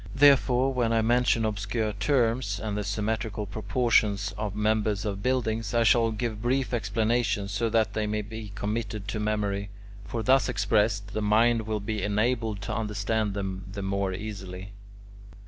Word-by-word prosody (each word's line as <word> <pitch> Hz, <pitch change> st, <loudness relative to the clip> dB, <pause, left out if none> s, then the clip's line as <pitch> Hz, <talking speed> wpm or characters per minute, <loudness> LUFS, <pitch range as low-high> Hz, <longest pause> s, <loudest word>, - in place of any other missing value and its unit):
Therefore, 135 Hz, -2 st, +5 dB
when 120 Hz, -3 st, +1 dB
I 115 Hz, -1 st, +2 dB
mention 120 Hz, -1 st, +3 dB
obscure 105 Hz, +1 st, -1 dB
terms, 115 Hz, -1 st, +1 dB
and 105 Hz, -2 st, -3 dB
the 105 Hz, -, -2 dB
symmetrical 105 Hz, +1 st, -2 dB
proportions 105 Hz, -1 st, +1 dB
of 105 Hz, -1 st, -4 dB
members 105 Hz, -1 st, 0 dB
of 100 Hz, -2 st, -3 dB
buildings, 120 Hz, -2 st, -1 dB
I 115 Hz, -, +4 dB
shall 115 Hz, 0 st, +4 dB
give 110 Hz, -1 st, -3 dB
brief 130 Hz, +2 st, 0 dB
explanations, 110 Hz, -1 st, 0 dB
so 115 Hz, +3 st, 0 dB
that 110 Hz, -1 st, +1 dB
they 110 Hz, -1 st, -1 dB
may 105 Hz, 0 st, -1 dB
be 110 Hz, 0 st, -8 dB
committed 105 Hz, 0 st, -3 dB
to 105 Hz, -, -2 dB
memory; 100 Hz, -2 st, -1 dB, 0.3 s
for 115 Hz, +2 st, -4 dB
thus 130 Hz, +1 st, +4 dB
expressed, 105 Hz, -2 st, +1 dB
the 110 Hz, -, -1 dB
mind 110 Hz, +2 st, +3 dB
will 110 Hz, -1 st, -1 dB
be 105 Hz, +1 st, -3 dB
enabled 110 Hz, 0 st, 0 dB
to 100 Hz, -, -4 dB
understand 105 Hz, -1 st, -1 dB
them 95 Hz, -1 st, -4 dB
the 100 Hz, 0 st, -5 dB
more 100 Hz, 0 st, -1 dB
easily. 95 Hz, -1 st, -7 dB
110 Hz, 160 wpm, -27 LUFS, 100-115 Hz, 0.3 s, Therefore